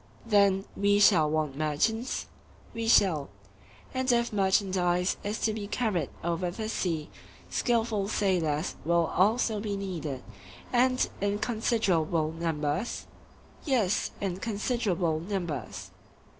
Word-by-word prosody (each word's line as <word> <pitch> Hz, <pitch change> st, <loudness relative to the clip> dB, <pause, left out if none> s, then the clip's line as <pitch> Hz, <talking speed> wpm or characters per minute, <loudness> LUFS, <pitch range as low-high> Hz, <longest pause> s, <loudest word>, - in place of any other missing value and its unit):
Then 200 Hz, -3 st, +3 dB
we 205 Hz, 0 st, +3 dB
shall 170 Hz, -7 st, +5 dB
want 155 Hz, -3 st, -1 dB
merchants? 155 Hz, -, 0 dB, 0.5 s
We 230 Hz, 0 st, -3 dB
shall. 170 Hz, -10 st, +4 dB, 0.6 s
And 260 Hz, 0 st, +1 dB
if 235 Hz, -1 st, +1 dB
merchandise 190 Hz, -2 st, +2 dB
is 210 Hz, +2 st, -2 dB
to 220 Hz, -, +1 dB
be 210 Hz, -2 st, -5 dB
carried 215 Hz, -6 st, -1 dB
over 170 Hz, +1 st, -1 dB
the 215 Hz, +5 st, -4 dB
sea, 165 Hz, -7 st, -2 dB, 0.4 s
skilful 225 Hz, -4 st, +1 dB
sailors 175 Hz, -7 st, 0 dB
will 170 Hz, 0 st, +3 dB
also 215 Hz, +3 st, +2 dB
be 205 Hz, -1 st, -3 dB
needed, 165 Hz, -9 st, -4 dB, 0.5 s
and 255 Hz, +1 st, +3 dB
in 200 Hz, 0 st, +1 dB
considerable 190 Hz, -9 st, +1 dB
numbers? 165 Hz, +4 st, -2 dB, 0.6 s
Yes, 230 Hz, -, +1 dB
in 190 Hz, -3 st, -2 dB
considerable 200 Hz, -6 st, -1 dB
numbers. 150 Hz, -, -4 dB
195 Hz, 115 wpm, -28 LUFS, 165-220 Hz, 0.6 s, shall